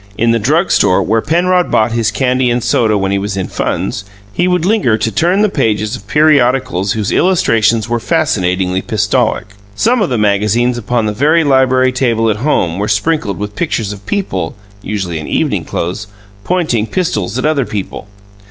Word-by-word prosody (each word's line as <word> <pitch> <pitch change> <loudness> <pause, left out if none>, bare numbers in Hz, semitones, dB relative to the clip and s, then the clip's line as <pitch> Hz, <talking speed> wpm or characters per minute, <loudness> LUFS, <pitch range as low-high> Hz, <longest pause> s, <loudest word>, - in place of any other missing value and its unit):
In 115 0 +2
the 115 - +1
drug 155 - +1
store, 95 -3 +3
where 110 +2 +1
Penrod 180 +5 +1
bought 110 +1 +2
his 115 -2 0
candy 125 +2 0
and 120 0 0
soda 110 -3 +2
when 95 -1 -1
he 100 - 0
was 100 0 -4
in 95 - -2
funds, 95 +3 -3 0.3
he 175 - +1
would 180 -2 +1
linger 190 - +2
to 110 +1 -1
turn 180 - +1
the - - +4
pages 110 - -1
of 105 -4 -12
periodicals 130 - +2
whose 105 -3 -2
illustrations 115 - +2
were 120 0 -1
fascinatingly 95 - 0
pistolic. 110 -1 -1 0.2
Some 235 - +1
of 195 - +1
the 125 - -1
magazines 105 +4 +1
upon 120 0 -1
the 105 - -1
very 155 +8 +2
library 130 -2 +3
table 115 -4 +1
at 105 - -2
home 100 - 0
were 105 - -1
sprinkled 105 - 0
with 105 0 -6
pictures 110 -10 -2
of 100 0 -13
people 95 - -2 0.3
(usually 95 -6 -4
in 80 - -7
evening - - -1
clothes) 90 +5 -4 0.4
pointing 155 - 0
pistols 115 - -2
at 130 - -2
other 145 -6 +1
people. 105 0 -6
115 Hz, 180 wpm, -14 LUFS, 105-145 Hz, 0.4 s, the